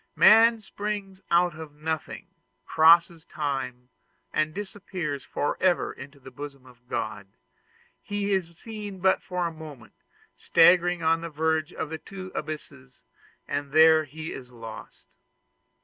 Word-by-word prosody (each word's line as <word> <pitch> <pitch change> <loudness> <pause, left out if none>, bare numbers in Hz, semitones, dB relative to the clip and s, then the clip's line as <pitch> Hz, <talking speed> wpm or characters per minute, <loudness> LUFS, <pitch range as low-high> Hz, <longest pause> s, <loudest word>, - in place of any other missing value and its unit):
Man 225 +1 +7
springs 200 -2 -5
out 175 0 +3
of 155 -2 -10
nothing, 160 +1 -4 0.4
crosses 165 +1 +5
time, 130 -6 -4 0.4
and 155 0 +1
disappears 185 -7 -5
forever 175 +4 0
in 135 - -10
the 130 - -11
bosom 140 0 -9
of 125 -1 -19
God; 110 -4 -4 0.7
he 205 0 -3
is 170 -3 -2
seen 210 -3 -8
but 190 +1 +3
for 180 -1 -3
a 170 - -3
moment, 155 -6 -11 0.4
staggering 175 0 +4
on 165 +1 +2
the 170 - -5
verge 160 0 0
of 155 - -5
the 160 - -4
two 185 -1 -9
abysses, 145 -4 -7 0.4
and 140 0 -3
there 160 0 +6
he 155 +3 -7
is 125 -2 -9
lost. 115 -3 -11
160 Hz, 135 wpm, -26 LUFS, 145-180 Hz, 0.7 s, Man